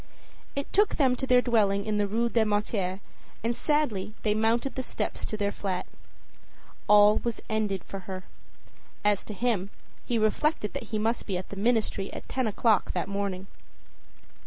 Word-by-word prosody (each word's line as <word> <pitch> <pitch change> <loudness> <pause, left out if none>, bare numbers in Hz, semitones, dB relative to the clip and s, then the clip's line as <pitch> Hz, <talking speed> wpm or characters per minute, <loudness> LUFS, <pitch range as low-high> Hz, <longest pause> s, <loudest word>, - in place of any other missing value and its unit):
It 280 0 -4
took 415 +1 +4
them 265 -4 +3
to 265 +1 -3
their 250 -1 +5
dwelling 205 -4 +2
in 215 -1 0
the 205 -1 +1
Rue 230 +4 +1
des 230 -1 +2
Martyrs, 205 -3 0 0.5
and 235 +1 0
sadly 235 -11 0
they 210 - +3
mounted 225 +5 +1
the 260 - -2
stairs - - -3
to 215 - -3
their 205 -1 0
flat. 190 -3 -3 1.0
All 210 0 +7
was 235 -2 -3
ended 210 -4 0
for 195 - -7
her. 185 0 -5 0.8
As 205 -2 +3
to 210 - -6
him, 210 -4 0 0.3
he 240 - -1
reflected 215 +3 +1
that 275 -4 -4
he 220 - -1
must 225 +3 0
be 190 -3 -1
at 185 - -7
the - - -7
ministry 210 -2 0
at - - -8
ten 260 -3 -1
o'clock 215 -1 +2
that 180 - -1
morning. 200 -2 -3
215 Hz, 175 wpm, -28 LUFS, 200-235 Hz, 1.0 s, All